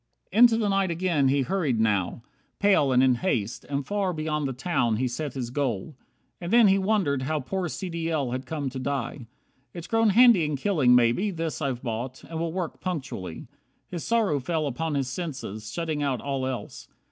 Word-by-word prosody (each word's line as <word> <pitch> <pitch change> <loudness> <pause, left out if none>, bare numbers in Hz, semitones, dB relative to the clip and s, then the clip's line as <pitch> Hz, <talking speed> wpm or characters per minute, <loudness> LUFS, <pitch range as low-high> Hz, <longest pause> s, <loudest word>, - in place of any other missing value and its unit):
64 210 - 0
Into 235 -2 +7
the 220 -2 0
night 195 -1 +1
again 170 -5 +1
he 135 +1 +2
hurried, 155 -9 0
now 105 0 0 0.3
Pale 195 -9 +3
and 125 0 +4
in 130 -1 +5
haste; 120 - -2
and 140 -1 -3
far 195 +1 -1
beyond 155 -2 -2
the - - -2
town 125 -4 0
He 130 +4 0
set 135 +3 -4
his 120 -3 -4
goal. 130 -1 -2 0.5
And 175 +1 -4
then 235 -3 +6
he 195 +1 +4
wondered 190 -9 +1
how 155 +4 -1
Poor 180 +6 -3
C. 190 - -5
D. 165 -1 -3
L. 145 -6 -1
had 130 +1 -4
come 150 -4 -3
to 135 - -5
die. 130 -2 -3 0.5
"It's 170 -1 -6
grown 225 +1 +2
Handy 230 -3 +6
in 150 -1 -1
killing, 140 -6 +3
maybe, 125 - +3
this 165 -4 -4
I've 130 -4 -2
bought, 120 +2 -4
And 165 -1 -6
will 165 0 -1
work 175 -2 -4
punctually." 130 - -5 0.4
His 170 -3 -5
sorrow 220 -11 +1
fell 155 +3 -1
Upon 150 +3 -2
his 135 -2 0
senses, 130 - -5
shutting 160 -3 -2
out 135 -4 0
all 135 -2 -2
else. 125 -5 -6
150 Hz, 200 wpm, -26 LUFS, 130-180 Hz, 0.5 s, Into